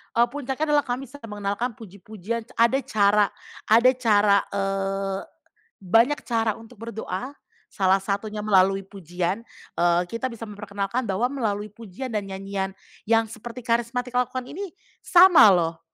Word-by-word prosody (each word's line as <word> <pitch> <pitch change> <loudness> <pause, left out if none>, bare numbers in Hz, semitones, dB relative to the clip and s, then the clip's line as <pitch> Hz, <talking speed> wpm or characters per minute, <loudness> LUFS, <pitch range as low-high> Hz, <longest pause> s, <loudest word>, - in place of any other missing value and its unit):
E 235 - +4
puncaknya 275 +3 -3
adalah 290 - +3
kami 255 +2 -4
bisa 275 +5 -12
mengenalkan 210 +2 -3
puji-pujian 215 +1 -7
ce 220 - -21
ada 235 +4 +4
cara 205 -1 +3 0.4
ada 235 +4 +5
cara, 210 -4 +4
eee, 195 0 -2 0.6
banyak 230 +9 +3
cara 225 -2 +1
untuk 225 +2 -14
berdoa, 225 +1 -5 0.4
salah 190 -1 +2
satunya 210 +2 -3
melalui 195 -1 +3
pujian, 180 0 -4 0.4
eee, 175 0 +3
kita 230 +3 -2
bisa 230 -2 -9
memperkenalkan 205 +2 -4
bahwa 210 +6 0
melalui 210 -6 -2
pujian 230 +4 -8
dan 210 -3 -2
nyanyian 195 0 -4 0.3
yang 225 0 +4
seperti 230 +2 -9
karismatik 240 +1 -1
lakukan 250 +1 -1
ini 370 +8 -8 0.2
sama 355 - +7
loh, 170 -4 +2
215 Hz, 140 wpm, -24 LUFS, 195-240 Hz, 0.6 s, sama